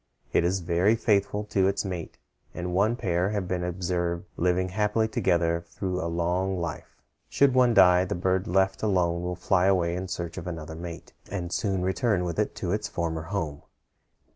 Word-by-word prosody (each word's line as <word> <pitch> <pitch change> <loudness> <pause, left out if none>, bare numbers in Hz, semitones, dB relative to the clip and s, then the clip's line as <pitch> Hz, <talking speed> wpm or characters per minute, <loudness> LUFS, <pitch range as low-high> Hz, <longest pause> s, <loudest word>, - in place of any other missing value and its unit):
It - - +4
is 90 +2 +1
very 90 +6 +2
faithful 105 -2 +1
to 95 -1 +4
its 100 +1 0
mate, 90 -4 -5 0.4
and 90 0 -3
one 105 +6 +2
pair 90 -5 0
have 100 -3 -2
been 90 -1 -2
observed 85 -1 -2
living 90 +1 +1
happily 105 +3 +1
together 85 -5 +1
through 90 0 -3
a 85 - -2
long 90 +3 0
life. 85 - -6 0.3
Should 140 -2 +3
one 125 -2 +4
die, 90 -2 +6
the 90 - -3
bird 95 +2 0
left 95 +1 +1
alone 90 -5 +1
will 90 0 -3
fly 90 +1 +2
away 85 -3 +2
in 95 +1 -4
search 85 0 -4
of 90 - -8
another 80 -2 -6
mate, 85 +1 -8 0.2
and 90 -3 -4
soon 95 -3 0
return 95 0 +1
with 85 +2 -3
it 105 - 0
to 90 - -3
its 105 +1 -1
former 80 -2 -2
home. 80 -8 -3
90 Hz, 185 wpm, -27 LUFS, 85-95 Hz, 0.4 s, die